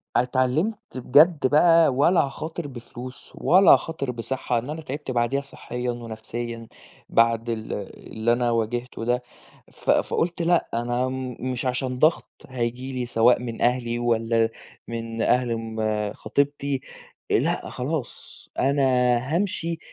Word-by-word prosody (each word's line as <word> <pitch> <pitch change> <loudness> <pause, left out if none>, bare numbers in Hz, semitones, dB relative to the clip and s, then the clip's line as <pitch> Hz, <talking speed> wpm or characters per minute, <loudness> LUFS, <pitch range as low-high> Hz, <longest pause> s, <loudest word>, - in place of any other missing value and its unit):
اتعلمت 130 - +1 0.2
بجد 145 +3 +5
بقى 165 +3 +5
ولا 165 +7 +4
هاخاطر 155 +3 -5
بفلوس، 125 0 -10
ولا 185 +3 +5
هاخاطر 140 -6 +2
بصحة، 120 0 -2
لأن 125 +5 -8
أنا 160 +1 -4
تعبت 145 -1 -5
بعديها 125 +3 +1
صحيًا 125 -3 -5
ونَفْسيًا، 115 0 -6 0.4
بعد 115 0 +2
ال 110 -1 -3 0.4
اللي 110 +2 +1
أنا 120 0 +1
واجهته 115 +1 -2
ده، 125 +1 0 0.5
ف - - -8
فقُلت 170 +1 0
لأ 170 +1 +2
أنا 120 +2 0
م 130 -2 -5
مش 130 0 -3
عشان 125 0 -2
ضغط 155 +2 +3 0.2
هييجي 125 +1 -3
لي 125 -1 -2
سواء 120 +1 +4
من 115 -2 -6
أهلي 120 -1 +1
والَّا، 115 -1 +1 0.4
من 115 -1 -4
أهل 125 0 +2
آمم 110 -2 -2
خطيبتي، 140 +2 -1 0.5
لأ - - +1
خلاص، 140 +1 -5
أنا 140 +2 +2 0.5
هامشي 170 -3 -1
125 Hz, 130 wpm, -24 LUFS, 115-140 Hz, 0.5 s, بجد